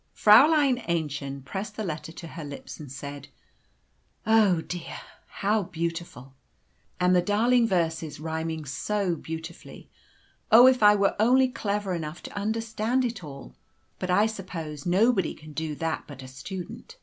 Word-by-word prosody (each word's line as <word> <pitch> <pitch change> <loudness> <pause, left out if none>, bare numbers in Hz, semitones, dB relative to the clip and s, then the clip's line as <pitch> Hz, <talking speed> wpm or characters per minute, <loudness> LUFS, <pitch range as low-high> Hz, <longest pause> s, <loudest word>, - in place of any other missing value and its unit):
A. - - -44
E.] - - -24
Fräulein 270 +3 +6
Aennchen 140 -4 -3
pressed 195 +8 -5
the 220 - -3
letter 160 -3 -5
to 165 0 -9
her 165 +1 -8
lips, 145 -1 -8
and 145 -4 -9
said, 140 +1 -8 1.0
"Oh, 220 0 +5
how 165 - -1
dear, 175 +1 -6 0.3
how 210 +2 0
beautiful! 165 -6 -5 0.7
And 180 0 +4
the 180 - +5
darling 230 +5 +3
verses, 160 -6 -1
rhyming 160 0 -4
so 190 +6 -1
beautifully. 160 0 -9 0.6
Oh, 235 +3 +9
if 260 -2 +5
I 210 0 +7
were 200 -1 +2
only 255 +4 +4
clever 205 -5 -2
enough 160 -1 -5
to - - -9
understand 225 +4 -1
it 235 -6 -4
all; 135 - -10 0.5
but 185 - -3
I 200 +4 +4
suppose 175 -8 -6
nobody 190 +1 +2
can 155 0 -13
do 155 -1 -3
that 165 +1 -3
but 135 -2 -10
a - - -9
student. 185 - -8
180 Hz, 160 wpm, -26 LUFS, 155-215 Hz, 1.0 s, Oh